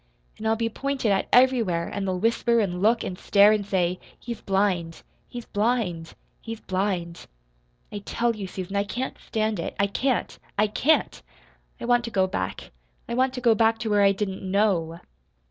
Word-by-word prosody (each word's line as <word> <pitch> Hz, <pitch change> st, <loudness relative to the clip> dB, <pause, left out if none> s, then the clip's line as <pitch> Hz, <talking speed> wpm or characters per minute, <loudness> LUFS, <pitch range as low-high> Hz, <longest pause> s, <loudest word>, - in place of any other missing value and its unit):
And 220 Hz, -, -3 dB
I'll 220 Hz, -, +3 dB
be 230 Hz, 0 st, -1 dB
pointed 265 Hz, -1 st, -1 dB
at 195 Hz, -, +1 dB
everywhere; 230 Hz, -10 st, +3 dB
and 200 Hz, -1 st, -4 dB
they'll 185 Hz, -1 st, -1 dB
whisper 230 Hz, +3 st, +2 dB
and 180 Hz, -4 st, -1 dB
look 225 Hz, +3 st, +3 dB
and 180 Hz, -, -5 dB
stare, 205 Hz, +1 st, +5 dB
and 215 Hz, -1 st, +1 dB
say, 185 Hz, -2 st, 0 dB, 0.2 s
'He's 235 Hz, -1 st, -7 dB
blind 190 Hz, -4 st, 0 dB, 0.3 s
he's 240 Hz, -1 st, -7 dB
blind 205 Hz, -7 st, -1 dB, 0.3 s
he's 225 Hz, -1 st, -7 dB
blind.' 185 Hz, -4 st, -3 dB, 0.6 s
I 205 Hz, -, -5 dB
tell 235 Hz, +3 st, -1 dB
you, 200 Hz, -3 st, -5 dB
Susan, 185 Hz, +1 st, -6 dB
I 200 Hz, -, +2 dB
can't 245 Hz, +6 st, -4 dB
stand 215 Hz, -2 st, -2 dB
it. -, -, -4 dB
I 200 Hz, -, +4 dB
can't 250 Hz, +5 st, -1 dB, 0.2 s
I 210 Hz, -, +4 dB
can't! 260 Hz, +6 st, +1 dB, 0.6 s
I -, -, -5 dB
want 240 Hz, 0 st, +3 dB
to -, -, -4 dB
go 190 Hz, -4 st, +2 dB
back. 95 Hz, -, -4 dB, 0.4 s
I 235 Hz, -, -4 dB
want 255 Hz, +2 st, +2 dB
to 250 Hz, -, -4 dB
go 235 Hz, -2 st, +5 dB
back 225 Hz, +1 st, +3 dB
to 225 Hz, -2 st, -3 dB
where 205 Hz, -1 st, +4 dB
I 200 Hz, 0 st, +6 dB
didn't 195 Hz, -1 st, -3 dB
KNOW!" 185 Hz, -4 st, 0 dB
205 Hz, 185 wpm, -25 LUFS, 190-230 Hz, 0.6 s, I